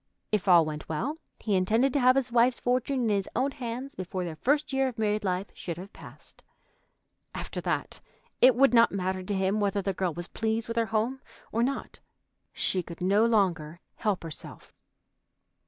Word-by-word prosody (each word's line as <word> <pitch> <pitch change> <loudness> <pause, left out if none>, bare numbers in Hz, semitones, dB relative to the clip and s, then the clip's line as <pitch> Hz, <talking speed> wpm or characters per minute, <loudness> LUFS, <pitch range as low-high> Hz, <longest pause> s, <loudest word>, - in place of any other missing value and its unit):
If 210 -2 0
all 175 -3 +7
went 150 -1 -6
well, 270 - -2 0.2
he 210 - -2
intended 225 +8 +2
to 285 - +2
have 255 0 +5
his 260 -2 0
wife's 240 +1 +3
fortune 255 +2 0
in 230 - +1
his 200 -2 0
own 265 +4 +1
hands 250 +2 -5
before 185 0 -4
their 170 -3 -5
first 285 - 0
year 270 0 +2
of 250 -3 -6
married 215 -1 0
life 185 0 -2
should 170 -2 -6
have 190 +3 -10
passed. - - -15 0.9
After - - -5
that - - -3 0.4
it 255 -1 +7
would 270 -1 +4
not 230 -1 +6
matter 185 -1 -2
to 195 +2 -3
him 190 +2 +1
whether 200 -1 0
the 195 0 -1
girl 185 -1 -1
was 175 +1 -5
pleased 225 0 -2
with 230 0 -4
her 230 -1 +2
home 230 +5 -1 0.3
or 230 - 0
not. 270 +3 -2 0.5
She 185 - 0
could 170 -1 -10
no 200 +5 +3
longer 175 -8 +1 0.2
help 205 -5 -1
herself. 165 -2 -9
215 Hz, 190 wpm, -28 LUFS, 185-245 Hz, 0.9 s, all